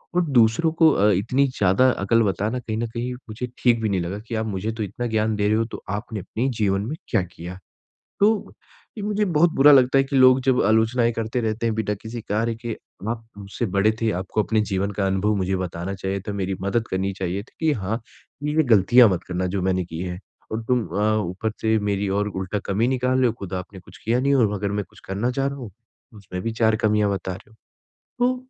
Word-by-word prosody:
और 180 - +3
दूसरों 120 +9 +4
को 160 - +8
अ, 105 -4 +3
इतनी 120 +9 +2
ज़्यादा 125 +1 +3
अकल 115 +4 +3
बताना 105 +5 -1
कहीं 110 -2 -4
न 115 0 -1
कहीं 120 +1 -3 0.2
मुझे 115 +3 -4
ठीक 120 -2 +3
भी 110 - 0
नहीं 95 -3 0
लगा 90 +4 -4
कि 115 - -4
आप - - -5
मुझे 105 +1 -3
तो 110 -1 -4
इतना 105 +5 -4
ज्ञान 110 0 +1
दे 105 0 +1
रहे 110 +1 +3
हो, 115 - +1
तो 115 - -9
आपने 105 +2 -4
अपने 115 +7 -3
जीवन 100 -1 +2
में 155 - -3
क्या 110 - +2
किया। 90 +1 -9 0.6
तो, 210 +1 +2 0.5
ये - - -4
मुझे 210 0 0
बहुत 170 -2 +3
बुरा 145 +2 +7
लगता 130 0 +5
है 135 - +4
कि 135 0 -2
लोग 130 0 +6
जब 130 -1 +3
आलोचनाएँ 115 +2 +3
करते 115 +2 -2
रहते 110 +1 -1
हैं 115 - +1
बिना 110 -1 -1
किसी 115 +1 -6
कार्य 115 +3 0
के। 115 -2 -3 0.3
आप 115 -1 -4
मुझसे 100 +4 -4
बड़े 110 +2 +4
थे, 115 -1 +1
आपको 95 +4 -1
अपने 110 0 +1
जीवन 95 +1 0
का 100 - +2
अनुभव 95 +2 +1
मुझे 95 0 0
बताना 90 +1 -4
चाहिए 95 0 -3
था, 105 - -1
मेरी 95 -1 -2
मदद 110 +4 0
करनी 95 +1 -1
चाहिए 95 +2 -2
थी - - -22
कि 155 - +4
हाँ, 110 -1 -2 0.5
ए, 150 - -1
वे 160 - +5
गलतियाँ 120 +4 +6
मत 90 -2 -1
करना 90 0 -1
जो 95 - -1
मैंने 95 -1 +1
की 80 -1 -8
हैं। 90 0 -5 0.3
और 110 +1 -2
तुम 125 -2 +1
अ, 105 +2 +1
ऊपर 95 +5 -3
से 110 0 +2
मेरी 100 0 0
और 105 - 0
उल्टा 95 +1 -3
कमी 110 +5 +1
निकाल 130 0 +1
रहे 130 - +4
हो, 115 - +1
खुद 95 -2 -7
आपने 95 +1 -6
कुछ - - -16
किया 120 +3 +2
नहीं 140 +1 +2
और 110 -6 +3
अगर 100 0 -2
मैं 105 -1 -1
कुछ - - -18
करना 100 +6 -1
चाह 135 +2 -1
रहा 140 - -3
हूँ, 120 -5 -7
तो 115 +1 -26
उसमें 90 -2 -7
भी 115 0 -2
चार 110 0 +4
कमियाँ 105 -1 +2
बता 95 -1 -3
रहे 95 - -14
हो। 110 - -21 0.7
तो 250 +1 +3
110 Hz, 240 wpm, -23 LUFS, 95-120 Hz, 0.7 s, को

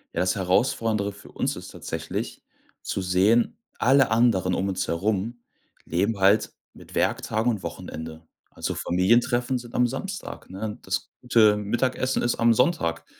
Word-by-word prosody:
Ja, - - +1
das 90 0 +1
Herausfordernde 100 +2 +1
für 100 - -15
uns - - -1
ist - - -9
tatsächlich, - - -5 0.4
zu - - -3
sehen 95 +6 +3 0.2
alle 135 0 +4
anderen 110 -6 +3
uns 95 -1 -1
herum 105 +6 -1 0.5
leben 105 0 0
halt 100 +3 +4 0.2
mit - - -14
Werktagen 110 +3 +1
und 105 -5 -4
Wochenende. 80 -2 -7 0.2
Also, - - -4
Familientreffen 120 +7 +2
sind 120 -1 -11
am 125 - +4
Samstag, 190 - -6
ne? 105 +3 -5
Das 95 0 -3
gute 115 -4 +5
Mittagessen 130 +5 0
ist 120 - +1
am 115 0 +5
Sonntag 115 - +1
105 Hz, 140 wpm, -25 LUFS, 95-120 Hz, 0.5 s, gute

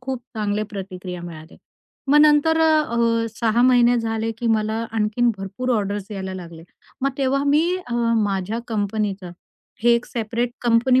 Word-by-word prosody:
खूप 255 -1 -4
चांगले 210 -1 -1
प्रतिक्रिया 185 -3 -7
मिळाल्या. 160 -1 -10 0.5
मग 295 - +6
नंतर 305 +2 +4
अ, 235 -8 +2
6 235 +1 +2
महिने 245 -1 +5
झाले 225 0 -2
की 235 - -3
मला 220 -1 +1 0.2
आणखीन 225 +2 +1
भरपूर 195 +7 -4
ऑर्डर्स 200 -1 -3
यायला 190 -2 -5
लागले. 170 -3 -9 0.4
मग 275 +1 +1
तेव्हा 275 +1 +1
मी 300 +4 +3 0.2
अ, 240 - -4 0.3
माझ्या 200 +2 -2
कंपनीचं 205 -3 -2 0.5
हे 240 - +5
एक 235 - -1
सेपरेट 235 +1 -2
कंपनी 245 +2 +3
225 Hz, 145 wpm, -22 LUFS, 200-250 Hz, 0.5 s, मग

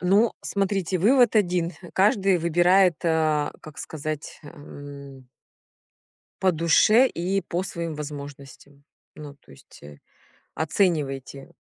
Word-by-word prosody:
Ну, 200 +5 +3
смотрите, 195 -2 -1
вывод 235 +3 +4
1: 180 -3 +1 0.2
каждый 195 -2 +2
выбирает, 175 +1 +3
а, 155 -3 +1
как 155 -1 -13
сказать, 155 -1 -6
м 140 -3 -12 1.2
по 190 -1 +3
душе 170 +9 +4
и 190 -2 -2
по 175 +2 -3
своим 170 -4 -5
возможностям. 140 -1 -10 0.3
Ну, 145 -2 -10
то - - -24
есть, 70 - -18
э, 75 0 -13 0.6
оценивайте, 145 -5 -2
165 Hz, 110 wpm, -24 LUFS, 145-190 Hz, 1.2 s, вывод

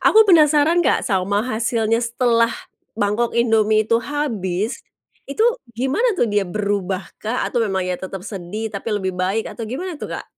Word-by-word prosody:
Aku 440 0 +7
penasaran 315 -2 +5
Kak - - +2
sama 200 0 0
hasilnya 230 -1 0
setelah 230 -1 +2 0.5
mangkok 215 +3 0
Indomie 220 -2 +3
itu 230 +1 +2
habis, 225 -7 -2 0.5
itu 355 +11 +1 0.3
gimana 340 - +1
tuh 245 - +3
dia 205 -2 +1
berubah 200 -2 -2 0.2
kah 225 +3 -2
atau 240 - -1
memang 190 -4 0
ya 180 -1 -2
tetap 190 0 -7
sedih 210 +2 -5
tapi 200 +3 -5
lebih 190 -2 -2
baik 185 +5 -1
atau 230 - -6
gimana 325 +5 -5
tuh - - -5
Kak? - - -7
225 Hz, 160 wpm, -20 LUFS, 200-255 Hz, 0.5 s, Aku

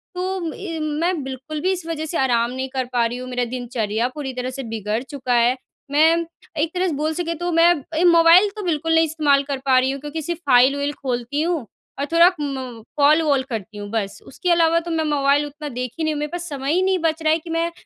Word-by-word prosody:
तो 365 -2 -3
इ 335 -5 -6
मैं 330 +1 -1
बिल्कुल 270 +4 -6
भी 375 +2 +1
इस 360 -3 -3
वजह 315 -1 -3
से 330 - -3
आराम 240 -2 +1
नहीं 260 +1 -4
कर 260 -1 -1
पा 235 -1 +2
रही 240 +2 -3
हूँ, 255 0 -7
मेरा 250 -1 -1
दिनचर्या 235 -2 -2
पूरी 270 -3 -5
तरह 250 0 -3
से 270 +1 -6
बिगड़ 215 0 -2
चुका 255 -3 -2
है। 240 +2 +4 0.4
मैं 325 +3 +4 0.3
एक 310 +2 0
तरह 370 +1 0
से 325 - -1
बोल 305 +2 -1
सकें, 335 0 -2
तो 350 +1 -2
मैं 335 +1 +5 0.3
ए 330 - +2
मोबाइल 340 +3 +7
तो 420 - -6
बिल्कुल 325 -2 0
नहीं 325 0 +5
इस्तेमाल 295 -3 +2
कर 275 - -1
पा 260 -1 +4
रही 260 +1 +1
हूँ 275 - -5
क्योंकि 295 +2 -5
सिर्फ़ 340 +2 -4
फाइल-उइल 280 +4 +4
खोलती 255 +1 -3
हूँ 330 -6 -1 0.3
और 280 - 0
थोड़ा 340 +2 +6
म 260 -5 -5
कॉल-वॉल 290 -2 +4
करती 220 -2 -5
हूँ, 205 0 -7
बस। 200 -3 -2
उसके 355 +6 -2
अलावा 335 -1 +4
तो 340 0 -6
मैं 325 -1 0
मोबाइल 290 -1 +2
उतना 295 +1 -7
देखी 250 +4 -4
नहीं 315 0 +1
हूँ, 295 - -4
मेरे 300 0 -2
पास 345 -1 -5
समय 275 0 -3
ही 365 - +2
नहीं 380 -1 +2
बच 320 0 0
रहा 310 0 +4
है 325 - +1
कि 330 - -12
मैं 335 +1 0
295 Hz, 240 wpm, -21 LUFS, 255-330 Hz, 0.4 s, मोबाइल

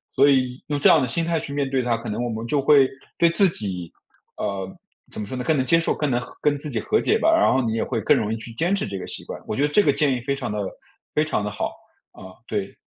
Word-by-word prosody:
所 140 +2 +5
以 130 -2 +1
用 145 -1 -1
这 - - +4
样 160 - +6
的 130 - 0
心 165 +8 0
态 165 -1 0
去 145 - -7
面 140 -1 0
对 135 -1 0
它， 120 -2 0
可 115 - -8
能 110 +3 -2
我 120 - -2
们 115 0 -4
就 140 +3 +1
会 140 -1 +6 0.3
对 170 - +5
自 190 +2 +4
己， 90 - -5 0.5
呃， 95 -1 -3 0.4
怎 - - -6
么 105 - -3
说 130 - -6
呢， 125 - -3
更 155 +2 +2
能 130 - +1
接 165 +6 +4
受， 165 - 0
更 150 -3 -1
能 120 0 +1 0.2
跟 145 -1 +1
自 150 - -5
己 - - -2
和 435 - +1
解 440 - +2
吧， 325 -6 +3
然 330 - +4
后 130 0 +2
你 110 - -1
也 115 - 0
会 120 -3 -2
更 - - +4
容 105 - -1
易 115 - -1
去 115 - -8
坚 170 +11 0
持 200 - 0
这 100 -1 -5
个 - - -7
习 - - -2
惯， - - -7
我 - - -2
觉 140 - +1
得 - - +4
这 150 +8 +4
个 145 - +3
建 140 -1 +1
议 125 - -3
非 140 +2 -1
常 130 -5 -4
地 105 - -3 0.6
非 150 - +3
常 155 -9 -1
地 105 - -2
好， 105 - -3 0.4
啊， 95 - -12 0.2
对。 100 -3 -4
130 Hz, 320 characters per minute, -23 LUFS, 110-150 Hz, 0.6 s, 样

